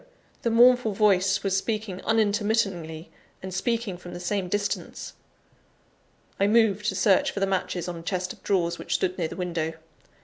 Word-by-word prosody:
the 235 Hz, -, 0 dB
mournful 240 Hz, -1 st, +5 dB
voice 195 Hz, -1 st, +3 dB
was 195 Hz, -1 st, +1 dB
speaking 210 Hz, -2 st, -2 dB
unintermittingly, 205 Hz, -7 st, 0 dB, 0.3 s
and 190 Hz, 0 st, -6 dB
speaking 220 Hz, 0 st, -1 dB
from 175 Hz, 0 st, -10 dB
the -, -, -6 dB
same 180 Hz, +1 st, -2 dB
distance. 205 Hz, +1 st, -3 dB, 1.3 s
I 200 Hz, -, +3 dB
moved 210 Hz, -2 st, +3 dB
to -, -, 0 dB
search 195 Hz, -4 st, +3 dB
for -, -, -4 dB
the 195 Hz, -, +2 dB
matches 185 Hz, -2 st, -2 dB
on 175 Hz, -, -4 dB
a -, -, -8 dB
chest 180 Hz, +1 st, -3 dB
of -, -, -20 dB
drawers, 170 Hz, -3 st, 0 dB
which -, -, -2 dB
stood 185 Hz, -1 st, 0 dB
near 165 Hz, -, 0 dB
the -, -, -8 dB
window. 170 Hz, -3 st, -2 dB
195 Hz, 170 wpm, -26 LUFS, 180-210 Hz, 1.3 s, mournful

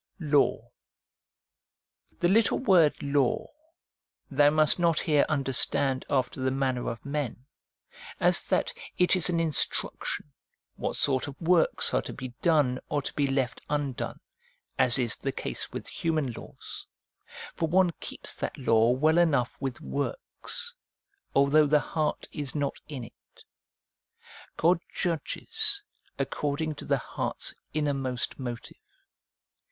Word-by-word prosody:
Law. 150 Hz, -4 st, +1 dB, 1.5 s
The 175 Hz, -, +4 dB
little 215 Hz, +5 st, +3 dB
word 180 Hz, -, +4 dB
' -, -, -13 dB
Law 140 Hz, -3 st, 0 dB, 0.4 s
' -, -, -45 dB
thou 145 Hz, +1 st, +5 dB
must 155 Hz, +2 st, +3 dB
not 170 Hz, -2 st, +2 dB
here 150 Hz, -3 st, +3 dB
understand 135 Hz, -2 st, +1 dB
after 130 Hz, -1 st, 0 dB
the 130 Hz, -, +1 dB
manner 130 Hz, -2 st, -1 dB
of 115 Hz, +2 st, -7 dB
men, 140 Hz, -3 st, -3 dB, 0.7 s
as -, -, +4 dB
that -, -, 0 dB, 0.2 s
it 180 Hz, +1 st, +4 dB
is 180 Hz, -1 st, +5 dB
an 170 Hz, -, +1 dB
instruc 165 Hz, -3 st, +1 dB
tion, 145 Hz, -, -4 dB, 0.4 s
what -, -, -3 dB
sort 135 Hz, -1 st, +2 dB
of 140 Hz, -, -9 dB
works 170 Hz, 0 st, +3 dB
are -, -, +3 dB
to -, -, -7 dB
be 130 Hz, -, -6 dB
done 145 Hz, -7 st, +3 dB
or 145 Hz, -1 st, -1 dB
to -, -, -5 dB
be 145 Hz, -1 st, +1 dB
left 135 Hz, -3 st, -1 dB
undone, 145 Hz, -4 st, -2 dB, 0.6 s
as 125 Hz, -2 st, +7 dB
is 120 Hz, -4 st, +1 dB
the 135 Hz, -, -3 dB
case -, -, -5 dB
with -, -, -6 dB
human 155 Hz, -6 st, -1 dB
laws; -, -, -9 dB, 0.7 s
for 165 Hz, -, -1 dB
one 180 Hz, +1 st, +4 dB
keeps -, -, -5 dB
that -, -, -5 dB
law 115 Hz, -3 st, +3 dB
well 155 Hz, +7 st, +3 dB
enough 140 Hz, -8 st, +2 dB
with 135 Hz, -3 st, -4 dB
works, 480 Hz, -, -4 dB, 0.6 s
although 145 Hz, +2 st, +5 dB
the 150 Hz, +1 st, +4 dB
heart 155 Hz, +1 st, -2 dB
is 145 Hz, -2 st, -5 dB
not 145 Hz, -2 st, -2 dB
in 140 Hz, -5 st, -6 dB
it. -, -, -16 dB, 1.1 s
God 170 Hz, +1 st, +3 dB
judges 400 Hz, -, +1 dB, 0.3 s
according 150 Hz, +2 st, -2 dB
to 145 Hz, -, -9 dB
the -, -, +2 dB
heart's -, -, -3 dB, 0.2 s
innermost 135 Hz, -5 st, -2 dB
motive. 120 Hz, -3 st, -6 dB
145 Hz, 135 wpm, -28 LUFS, 130-160 Hz, 1.5 s, as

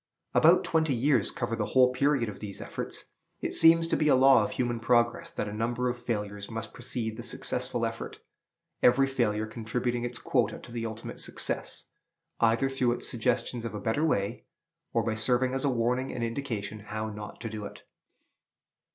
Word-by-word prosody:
About -, -, +6 dB
twenty 160 Hz, -4 st, +1 dB
years 125 Hz, -3 st, +3 dB
cover 120 Hz, -1 st, -3 dB
the 115 Hz, -, -1 dB
whole 125 Hz, 0 st, +6 dB
period 135 Hz, -2 st, +2 dB
of 105 Hz, -, -7 dB
these 100 Hz, -2 st, -6 dB
efforts. -, -, -5 dB, 0.3 s
It -, -, -3 dB
seems 165 Hz, 0 st, +6 dB
to -, -, +2 dB
be 150 Hz, -, +1 dB
a 145 Hz, -, +6 dB
law 135 Hz, +1 st, +6 dB
of -, -, -2 dB
human 120 Hz, -2 st, -1 dB
progress 120 Hz, 0 st, +2 dB
that -, -, -4 dB
a 105 Hz, -, -5 dB
number 120 Hz, +3 st, -1 dB
of 120 Hz, 0 st, -4 dB
failures 105 Hz, -3 st, -3 dB
must 110 Hz, -2 st, -6 dB
precede 120 Hz, -3 st, -4 dB
the -, -, -5 dB
successful -, -, -2 dB
effort, -, -, -5 dB, 0.6 s
every 135 Hz, +3 st, +5 dB
failure 115 Hz, -5 st, 0 dB
contributing 120 Hz, +2 st, -2 dB
its 120 Hz, 0 st, -3 dB
quota 115 Hz, -5 st, 0 dB
to -, -, -12 dB
the 115 Hz, -1 st, -3 dB
ultimate 110 Hz, +1 st, -7 dB
success, -, -, -2 dB, 0.5 s
either 115 Hz, +3 st, +3 dB
through 130 Hz, -3 st, +1 dB
its -, -, -1 dB
suggestions 120 Hz, 0 st, 0 dB
of 115 Hz, -2 st, -5 dB
a -, -, -3 dB
better 115 Hz, +8 st, 0 dB
way, 115 Hz, -6 st, 0 dB, 0.5 s
or 115 Hz, -, +1 dB
by 110 Hz, -, 0 dB
serving 125 Hz, +3 st, +2 dB
as 135 Hz, -, -2 dB
a 140 Hz, -, +2 dB
warning 125 Hz, +1 st, 0 dB
and 120 Hz, -, -4 dB
indication 115 Hz, -4 st, -3 dB
how 110 Hz, +1 st, -5 dB
not 105 Hz, 0 st, -8 dB
to 115 Hz, -, -4 dB
do 105 Hz, -1 st, -6 dB
it. -, -, -10 dB
120 Hz, 185 wpm, -28 LUFS, 110-125 Hz, 0.6 s, About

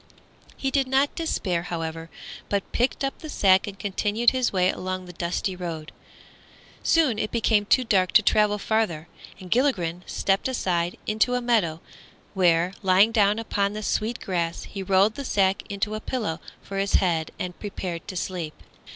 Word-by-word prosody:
He 270 Hz, -, -1 dB
did 270 Hz, -1 st, +1 dB
not 270 Hz, +2 st, +2 dB
despair, 195 Hz, -, -1 dB
however, 165 Hz, -1 st, -5 dB, 0.4 s
but 200 Hz, -1 st, -2 dB
picked 245 Hz, +3 st, 0 dB
up 275 Hz, -, -2 dB
the 310 Hz, -, -8 dB
sack 190 Hz, -8 st, +4 dB
and 200 Hz, -1 st, -7 dB
continued 205 Hz, +4 st, +1 dB
his 255 Hz, -2 st, 0 dB
way 185 Hz, -1 st, +2 dB
along 185 Hz, 0 st, -4 dB
the 180 Hz, -, -10 dB
dusty 180 Hz, +1 st, -2 dB
road. 165 Hz, -4 st, -6 dB, 0.9 s
Soon 295 Hz, -10 st, +3 dB
it 215 Hz, -, -1 dB
became 220 Hz, -3 st, +1 dB
too 255 Hz, -, +4 dB
dark 190 Hz, -6 st, +2 dB
to 220 Hz, -, +6 dB
travel 210 Hz, 0 st, +3 dB
farther, 200 Hz, -7 st, -1 dB, 0.3 s
and 185 Hz, -2 st, -11 dB
Gilligren 180 Hz, -, +1 dB
stepped 195 Hz, +4 st, 0 dB
aside 180 Hz, -9 st, -1 dB
into 220 Hz, +4 st, +1 dB
a -, -, +1 dB
meadow, 215 Hz, -10 st, +1 dB, 0.5 s
where, 175 Hz, -1 st, +3 dB
lying 195 Hz, +3 st, +5 dB
down 210 Hz, -2 st, +3 dB
upon 205 Hz, -3 st, -1 dB
the 215 Hz, 0 st, -5 dB
sweet 220 Hz, +3 st, -1 dB
grass, 170 Hz, -3 st, -2 dB
he 195 Hz, -, -7 dB
rolled 195 Hz, +3 st, +3 dB
the 280 Hz, -, -6 dB
sack 195 Hz, -6 st, +1 dB
into 200 Hz, +1 st, -2 dB
a 215 Hz, -, -3 dB
pillow 215 Hz, -8 st, -3 dB, 0.2 s
for 195 Hz, 0 st, -4 dB
his 195 Hz, 0 st, -1 dB
head 165 Hz, -4 st, +2 dB
and 180 Hz, -1 st, -5 dB
prepared 185 Hz, -5 st, -5 dB
to 190 Hz, -, -6 dB
sleep. 175 Hz, -3 st, -4 dB
195 Hz, 170 wpm, -25 LUFS, 180-220 Hz, 0.9 s, to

